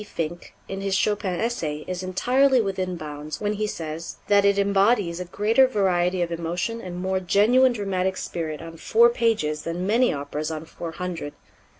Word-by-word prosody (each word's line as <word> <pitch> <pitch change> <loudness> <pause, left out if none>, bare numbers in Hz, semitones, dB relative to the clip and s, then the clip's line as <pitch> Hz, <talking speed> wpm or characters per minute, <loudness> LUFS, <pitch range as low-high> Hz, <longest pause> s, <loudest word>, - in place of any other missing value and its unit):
Finck, 170 +1 -4
in 195 0 -5
his 195 -1 0
Chopin 200 -3 0
essay, 160 -11 -2
is 185 -1 -3
entirely 255 +8 +3
within 190 -4 -1
bounds 150 -1 -6
when 210 0 -1
he 210 0 -1
says 160 -3 -5
that 200 -1 +5
it 200 0 +4
embodies 200 -2 +2
a 180 - -4
greater 215 +8 +3
variety 185 -5 +1
of 170 - -4
emotion 175 +7 -3
and 180 -3 -6
more 190 +1 0
genuine 225 +8 +4
dramatic 190 -3 -1
spirit 160 -2 -4
on 165 0 -9
four 235 +7 +5
pages 215 -11 0
than 170 +3 -3
many 235 +5 +3
operas 145 +2 -4
on 160 0 -5
four 165 0 -7
hundred. 175 -5 -5
185 Hz, 175 wpm, -24 LUFS, 165-210 Hz, -, that